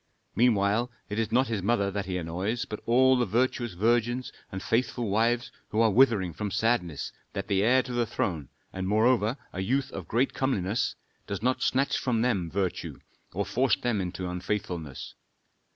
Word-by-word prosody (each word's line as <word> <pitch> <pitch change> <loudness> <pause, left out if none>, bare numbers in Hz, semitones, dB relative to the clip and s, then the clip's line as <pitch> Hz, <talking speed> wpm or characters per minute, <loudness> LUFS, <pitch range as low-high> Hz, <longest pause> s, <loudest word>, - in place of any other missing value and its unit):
Meanwhile 115 0 +3 0.2
it 105 - -2
is 110 -2 -1
not 130 +3 +4
his 110 -4 -2
mother 100 -1 +1
that 100 -1 -3
he 90 -1 -2
annoys, 90 +7 -2
but 105 - -6
all 130 +2 +5
the 125 -1 +2
virtuous 120 +1 0
virgins 120 +5 +1 0.2
and 95 0 -5
faithful 120 -1 0
wives 115 +4 +1 0.2
who 110 - -1
are 115 -1 +5
withering 105 -7 +4
from 105 +5 -3
sadness 95 -9 0 0.2
that 100 0 -4
the 100 -2 +2
heir 130 +5 +4
to 125 - -6
the 120 -1 +1
throne, 80 - -2 0.2
and 95 0 -3
moreover 110 +3 +3 0.2
a 90 - -5
youth 130 +7 0
of 95 -5 -7
great 125 +4 +1
comeliness, 110 -5 0 0.3
does 100 +1 -4
not 130 +1 +1
snatch 135 +2 +1
from 115 -3 0
them 100 -9 0
virtue 95 0 -2 0.4
or - - -1
force 130 -2 +2
them 100 -7 -1
to 90 -1 -4
unfaithfulness. 90 -5 -4
110 Hz, 175 wpm, -28 LUFS, 95-120 Hz, 0.4 s, all